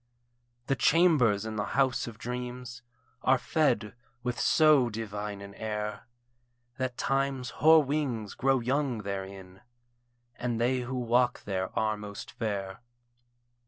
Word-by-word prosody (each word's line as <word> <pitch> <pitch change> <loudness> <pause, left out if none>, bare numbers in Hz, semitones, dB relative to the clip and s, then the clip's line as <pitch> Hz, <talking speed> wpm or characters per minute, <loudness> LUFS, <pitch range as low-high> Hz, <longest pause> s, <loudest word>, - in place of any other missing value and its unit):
The 135 - +1
chambers 140 - +4
in 110 -1 -4
the 105 - 0
house 135 -3 +2
of 115 -2 -8
dreams 125 0 -6 0.4
Are 130 +1 +4
fed 125 -8 +1 0.3
with 125 -1 -2
so 150 -6 +5
divine 105 -2 -5
an 100 0 -9
air, 105 +1 -4 0.7
That 130 -2 -3
Time's 135 -2 -1
hoar 160 +1 +7
wings 135 -7 -2
grow 135 -1 +2
young 130 -2 0
therein, 95 -1 -6 0.8
And 120 -2 -2
they 125 +2 +2
who 125 +1 -4
walk 120 0 +1
there 95 -2 -2
are 110 0 +1
most 105 -1 -8
fair. 100 -2 -4
120 Hz, 125 wpm, -29 LUFS, 105-130 Hz, 0.8 s, hoar